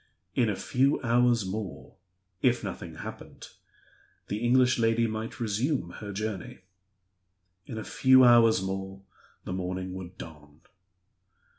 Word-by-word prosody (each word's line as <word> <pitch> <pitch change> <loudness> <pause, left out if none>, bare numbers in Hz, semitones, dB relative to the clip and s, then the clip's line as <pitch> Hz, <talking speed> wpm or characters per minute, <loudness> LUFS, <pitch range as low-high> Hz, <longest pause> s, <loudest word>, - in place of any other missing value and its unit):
In 120 -3 +2
a 105 - -1
few 135 +8 +1
hours 120 -2 +3
more 100 +1 -6 0.5
(if - - +2
nothing - - -6
happened) - - -9 0.8
the 105 - -2
English 125 +2 +3
lady 115 0 +2
might 110 +5 -4
resume 115 - -1
her 105 -1 -6
journey. 105 -1 -5 1.1
In 115 - -6
a 110 - -4
few 130 0 +5
hours 115 -5 +6
more 95 0 -5 0.4
the 90 - -5
morning 95 0 -4
would 90 -1 -8
dawn. 75 -2 -12
110 Hz, 125 wpm, -28 LUFS, 95-120 Hz, 1.1 s, hours